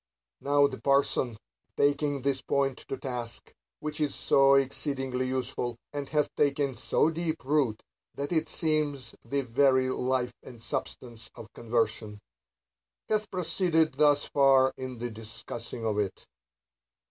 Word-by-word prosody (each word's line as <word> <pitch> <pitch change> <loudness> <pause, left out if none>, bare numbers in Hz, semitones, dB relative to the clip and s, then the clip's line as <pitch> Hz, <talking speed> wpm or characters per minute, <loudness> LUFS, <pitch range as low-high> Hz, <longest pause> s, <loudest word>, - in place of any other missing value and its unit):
Now 145 0 +3
the - - -3
parson, 140 -4 +2 0.4
taking 145 -1 +1
this 135 -1 0
point 135 -2 0
to 135 - -3
task 120 -3 -5 0.3
(which 150 0 -4
is 150 - 0
so 135 0 +5
exceeding 135 -1 0
useful, 130 -2 -2 0.2
and 145 -1 -4
hath 150 -1 +1
taken 140 -2 +1
so 155 - +1
deep 160 -4 -3
root 135 -6 +1 0.3
that 140 +2 -4
it 160 -2 +1
seems 150 -6 0
the 140 0 -1
very 130 +1 +3
life 130 -1 0
and 125 -3 -12
substance 115 0 -5
of 115 - -11
conversation), 110 -2 -1 0.9
hath 215 -1 0
proceeded 165 -3 +1
thus 145 +1 +3
far 135 -2 +4
in 130 -1 -6
the 120 +1 -4
discussing 115 +1 -7
of 105 -2 0
it. 100 -2 -3
135 Hz, 135 wpm, -29 LUFS, 120-145 Hz, 0.9 s, so